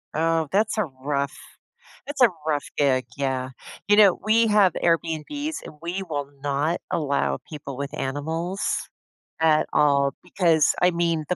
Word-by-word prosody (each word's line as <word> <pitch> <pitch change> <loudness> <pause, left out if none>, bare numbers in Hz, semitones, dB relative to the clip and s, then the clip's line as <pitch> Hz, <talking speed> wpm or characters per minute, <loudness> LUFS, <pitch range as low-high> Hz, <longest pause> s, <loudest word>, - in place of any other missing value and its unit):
Oh, 165 0 +1
that's 215 +2 +1
a 215 - +2
rough 140 0 -3 0.7
that's 290 -1 -6
a 250 - +8 0.2
rough 150 -2 0
gig, 130 -3 +2
yeah. 130 -2 -2 0.4
You 205 - +6
know, 200 -4 +6
we 225 +2 +3
have 205 -4 +4
Airbnb's, 170 - -1
and - - -10
we 175 +3 -4
will 145 -6 -4
not 145 +4 0
allow 140 -3 0
people 140 -4 -8
with 140 0 -5
animals 160 +8 -3 0.8
at 155 -1 +3
all, 140 -1 +3
because, 170 -4 +2
I 180 - +5
mean, 170 -2 0
the 180 - 0
160 Hz, 150 wpm, -24 LUFS, 140-185 Hz, 0.8 s, a